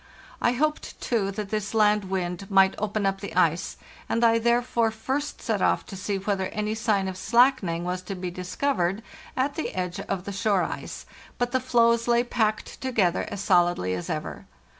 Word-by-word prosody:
I 240 - +3
hoped, 305 +4 -1
too, 215 -5 0
that 205 0 -5
this 215 0 -2
land 210 -1 +4
wind 185 0 -3
might 195 -1 +5
open 210 0 -1
up 195 0 0
the 195 -5 -7
ice, 170 -2 +1 0.3
and 230 - +1
I 230 0 +5
therefore 235 0 +2
first 265 +7 -3
set 220 -5 0
off - - +2
to - - -9
see 195 +1 -2
whether 195 -1 -1
any 210 +2 -2
sign 215 -3 +1
of 190 - -4
slackening 225 -6 +3
was 180 +1 -2
to 195 - -2
be 180 -1 -4
discovered 185 +2 -1 0.3
at 270 +2 +1
the 320 - -4
edge 180 -1 -3
of 190 -2 -3
the 200 - -5
shore 200 -2 +2
ice; - - -6 0.3
but 245 0 -1
the 260 - +2
floes 235 -1 +3
lay 240 0 +4
packed 220 -3 -1
together 215 -9 +1
as 200 -1 -5
solidly 175 - +3
as 90 -1 -4
ever. - - -5
210 Hz, 185 wpm, -26 LUFS, 185-235 Hz, 0.3 s, might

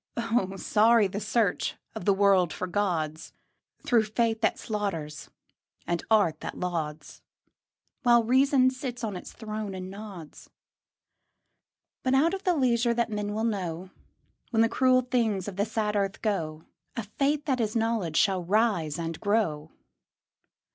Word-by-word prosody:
Oh, 230 -5 0
sorry 220 +3 +4
the 195 +1 -3
search 215 -2 0 0.2
of - - -7
the 200 - +5
world 195 -4 +4
for - - -4
gods, 175 -5 -2 0.5
Through 230 -3 +3
faith 225 +1 0
that 220 - +2
slaughters 185 -9 -4 0.6
and 170 -1 -2
art 200 -8 +3
that - - -6
lauds, 160 -4 -4 0.8
While 240 -2 +5
reason 260 +2 +4
sits 255 -2 -6
on 210 -3 -2
its 180 - -8
throne 215 -3 -5
and 185 0 -6
nods. 195 -6 -10 1.5
But 260 0 +1
out 320 +6 +3
of 390 0 -5
the 360 -2 +3
leisure 240 -4 +2
that 235 -1 0
men 210 0 -3
will 220 - -1
know, 185 -5 -3 0.6
When 225 -2 +3
the 230 - +2
cruel 255 +1 +3
things 230 -7 0
of 200 - -5
the 200 +2 0
sad 215 -1 -1
earth 195 -1 -1
go, 160 -7 -2 0.3
A 230 - -3
Faith 280 +7 -1
that 260 -4 0
is 215 0 -1
Knowledge 225 -8 0
shall 190 -3 +2
rise 190 -6 +1
and 165 -1 -4
grow. 170 -8 0
210 Hz, 150 wpm, -27 LUFS, 185-235 Hz, 1.5 s, the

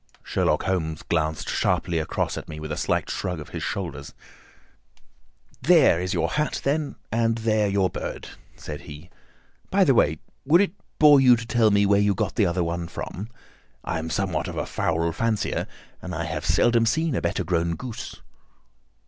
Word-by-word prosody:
Sherlock - - 0
Holmes 80 -4 -2
glanced 80 -1 -1
sharply 85 -2 0
across 80 - -2
at - - -7
me 75 - -7
with 75 0 -6
a - - -1
slight - - 0
shrug 90 -3 -3
of 75 - -9
his - - -6
shoulders. 70 +1 -5 1.5
"There 155 - +5
is 90 0 -2
your 85 -3 +1
hat, 150 0 -1
then, 145 +1 -1 0.2
and 115 0 +1
there 110 -2 +1
your 100 -1 +2
bird," - - -6 0.3
said 75 -2 -7
he. 75 +4 -11 0.6
"By 195 0 +4
the 140 -7 +4
way, 80 -9 +3 0.3
would 160 +5 +5
it 200 -3 +2 0.3
bore 150 -3 +7
you 125 -2 +7
to 115 0 -6
tell 115 -1 +3
me 100 0 +3
where 100 0 +4
you 100 -1 +2
got - - -1
the 105 - +2
other 85 +1 0
one 85 0 -3
from? 100 +5 -6 0.5
I 85 - -2
am 80 0 -5
somewhat 95 -1 -1
of - - -6
a - - -1
fowl 85 +1 -1
fancier, 110 +4 -1 0.3
and 90 -2 -6
I 85 - -2
have 80 -2 -4
seldom 115 +6 +3
seen 160 +5 +1
a - - -1
better - - -1
grown 85 -1 0
goose." 125 +1 -8
95 Hz, 180 wpm, -24 LUFS, 85-115 Hz, 1.5 s, bore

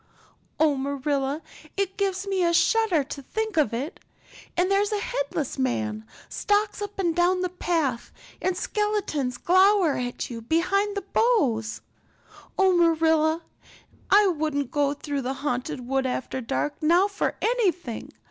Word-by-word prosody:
Oh, 310 -1 +4
Marilla, 280 +2 -2 0.3
it 390 -1 -1
gives 390 -1 -1
me 385 -2 0
a 340 0 +3
shudder 435 -7 +3
to 280 +1 -7
think 440 +9 -3
of 300 -9 +3
it. 265 +9 -4 0.6
And 365 +2 +2
there's 400 +1 +2
a 420 - +1
headless - - -3
man 110 -4 -1 0.2
stalks 415 +1 0
up 410 0 -5
and 345 -4 0
down 360 +1 +2
the 365 - 0
path 325 -9 -1 0.3
and 370 -1 0
skeletons 380 - -1
glower 375 -2 +4
at 245 -1 -3
you 230 -1 -6
between 375 - +1
the 400 - -3
boughs. 265 - +2 0.8
Oh, 380 -1 +4
Marilla, 320 -1 +3 0.7
I 410 +1 +6
wouldn't 300 -6 -1
go 285 -1 +1
through 285 -1 -3
the 260 +1 -2
Haunted 250 -1 -2
Wood 265 0 +1
after 260 +1 -3
dark 275 +6 -2
now 345 +5 +4
for 400 -1 -2
anything. 370 - -1
330 Hz, 145 wpm, -25 LUFS, 270-395 Hz, 0.8 s, I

